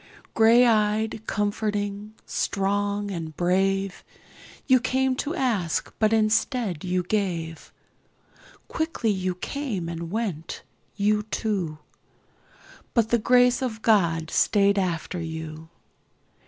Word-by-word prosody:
Grey 230 +2 +6
eyed, 215 -1 +1
comforting, 205 0 -2
strong 205 +1 -1
and 165 -4 -6
brave, 195 +2 0 0.6
You 260 -2 +5
came 260 +1 +1
to 305 +6 -2
ask 215 - -1
but 215 -1 +3
instead 220 - +1
you 180 0 0 1.6
Quickly 315 -9 -1
you 185 -2 -2
came 215 -4 -4
and 170 0 -5
went, 190 -6 -4 0.3
you 210 +1 +2
two, 190 -10 -2 1.2
But 230 -2 +3
the 235 - +3
Grace 245 +2 +4
of 220 -4 -4
God 165 -7 +2
stayed 200 -1 +3
after 175 -1 -2
you. 160 -1 -7
205 Hz, 100 wpm, -25 LUFS, 180-225 Hz, 1.6 s, Grey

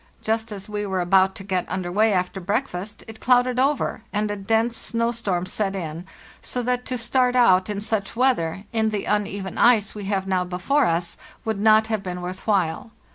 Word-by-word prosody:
Just 225 0 -1
as 195 -2 -6
we 210 -1 -3
were 190 -2 -2
about 190 +2 +3
to 195 - -8
get 185 -2 -2
under 185 -1 -3
way 215 +4 +3
after 185 0 -1
breakfast 205 0 -3
it 220 0 -10
clouded 250 0 +3
over, 275 -3 +1
and 210 0 -1
a - - -2
dense 225 +4 0
snow 230 +1 0
storm 195 -7 -2
set 195 +1 -1
in, 170 -1 -5 0.3
so 250 - -2
that 250 +1 -1
to 255 - -2
start 250 +2 +1
out 190 -6 +4
in 205 -1 -3
such 215 -1 -2
weather, 215 -8 +1
in 220 -1 +2
the 210 -2 -3
uneven 200 -2 -2
ice 225 -3 +4
we 205 -2 -7
have 195 -1 -1
now 185 -1 +1
before 180 +11 +1
us, 170 +1 -1 0.3
would 220 -2 -1
not 215 +1 +5
have 220 -2 -2
been 180 -2 -5
worth 185 +3 -7
while. 195 +1 0
205 Hz, 200 wpm, -23 LUFS, 185-225 Hz, 0.3 s, not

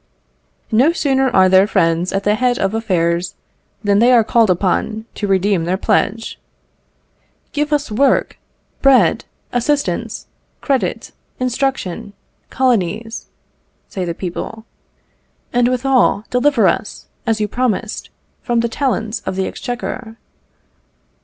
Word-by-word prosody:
No 260 +9 +4
sooner 270 -4 +1
are 190 -5 +5
their 190 +2 +5
friends 165 -2 +1
at 195 0 -1
the 210 - +2
head 245 +2 +1
of 195 +1 -1
affairs, 180 -5 0 0.5
than 205 -1 +3
they 240 +3 +5
are 240 -2 +6
called 225 0 +3
upon 200 +4 0
to 205 - -3
redeem 190 -2 +1
their 180 +2 0
pledge. 225 +3 0 1.1
"Give 295 +1 -1
us 290 -4 0
work, 265 +5 +1 0.4
bread, 275 -2 +4 0.3
assistance, 285 +4 -1 0.3
credit, 275 -3 -1 0.3
instruction, 250 -7 -2 0.4
colonies," 225 -3 -1 0.6
say 190 - -4
the 170 -1 -3
people; 210 +5 -6 0.9
"and 245 0 +3
withal 255 -4 +2
deliver 250 -4 +3
us, 185 - -2 0.2
as 225 -1 +1
you 210 - 0
promised, 235 -1 -2 0.3
from 240 -2 0
the 235 - -1
talons 230 -3 -1
of - - -2
the 190 0 -1
exchequer." 245 -1 -5
225 Hz, 120 wpm, -18 LUFS, 195-255 Hz, 1.1 s, are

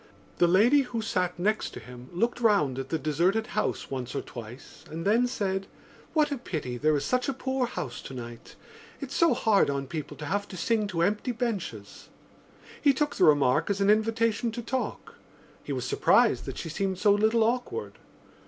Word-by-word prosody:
The 175 - +5
lady 225 +11 +5
who 245 -3 -4
sat 185 -5 -1
next 215 +5 -1
him 125 +1 -10
looked 230 +7 -1
round 175 - +3
at 135 0 -5
the 165 - 0
deserted 175 +9 +1
house 215 - -2
once 130 -2 -4
or - - -1
twice 120 +2 -11
and 165 +2 -6
then 230 +5 +3
said: 195 -5 -2 0.5
"What 305 -2 +2
a 280 - -2
pity 155 - -4
there 155 +2 +3
is 140 - -3
such 250 +1 0
a - - 0
poor 260 0 -1
house 145 - -5
tonight! 120 -2 -9 0.4
It's 280 -1 -6
so 335 -1 +4
hard 210 -7 +3
on 140 -1 -2
people 150 +2 -6
to 150 - -6
have 200 +6 -1
to 185 - -9
sing 215 +4 +1
to 170 -4 -1
empty 210 +7 0
benches." 195 - -4 0.7
He 285 -2 +5
took 295 +2 -1
the - - +5
remark 145 +1 +4
as 200 -1 0
an 200 +1 +4
invitation 225 +1 +1
to 240 0 -5
talk. 255 +3 -4 0.5
He - - -6
was - - -2
surprised - - +3
that - - -6
she 165 - -5
seemed 190 +3 -2
so 205 +2 +4
little 220 +2 +3
awkward. 250 - -2
200 Hz, 190 wpm, -27 LUFS, 150-235 Hz, 0.7 s, The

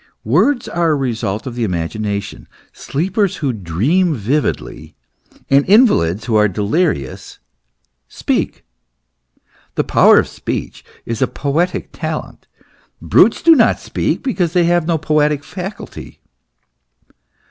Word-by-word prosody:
Words 215 - +2
are 170 -1 0
a 155 - +2
result 115 -6 -3
of 130 - -5
the 120 -1 -3
imagination. 100 +2 -3 0.3
Sleepers 185 +6 -1
who 140 -5 -2
dream 120 - 0
vividly, 130 +7 -3 0.5
and 140 +1 +4
invalids 110 - +4
who 115 - -1
are 105 0 +4
delirious, 100 - -2 0.7
speak. - - -2 1.1
The - - +1
power - - +5
of - - +3
speech - - -5 0.2
is 115 +1 -4
a 130 - +3
poetic 155 +8 -2
talent. - - -6 0.5
Brutes - - +3
do 330 - +7
not 240 -6 +3
speak - - -2
Because 185 - -1
they 180 -2 +3
have 170 -1 +1
no 165 -2 +1
poetic 150 -1 +1
faculty. 185 +6 -8
145 Hz, 120 wpm, -17 LUFS, 110-175 Hz, 1.1 s, do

